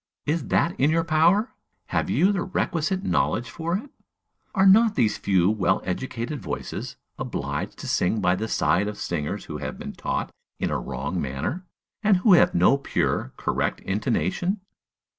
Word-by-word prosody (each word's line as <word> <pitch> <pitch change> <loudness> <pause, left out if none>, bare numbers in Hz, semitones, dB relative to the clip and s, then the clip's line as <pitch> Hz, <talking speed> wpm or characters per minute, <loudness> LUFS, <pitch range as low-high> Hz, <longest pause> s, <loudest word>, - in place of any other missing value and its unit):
Is 160 +3 -1
that 170 - +2
in 140 - +4
your 165 +1 +2
power? 165 +8 +3 0.4
Have - - 0
you 195 - +3
the 195 -3 -1
requisite 185 0 -1
knowledge 125 -9 0
for 170 +2 -2
it? 265 +6 -10 0.6
Are 190 -1 +4
not 215 +3 +6
these 110 -4 +1
few 95 -1 +3
well 95 -4 +1
educated 120 +7 -3
voices 75 -6 -5 0.2
obliged - - -4
to - - -7
sing 100 +5 +1
by 90 - +2
the 110 +4 -3
side 100 -2 +2
of 105 -1 -5
singers 75 -4 -3
who - - -6
have - - -5
been - - -7
taught - - -3 0.3
in - - -1
a - - 0
wrong 70 +8 -3
manner, 70 - -3 0.3
and 210 -3 +4
who 195 +2 +5
have 175 - +5
no 115 +11 +4
pure, 65 - -1
correct - - -1
intonation? 105 - -1
140 Hz, 165 wpm, -25 LUFS, -, 0.6 s, not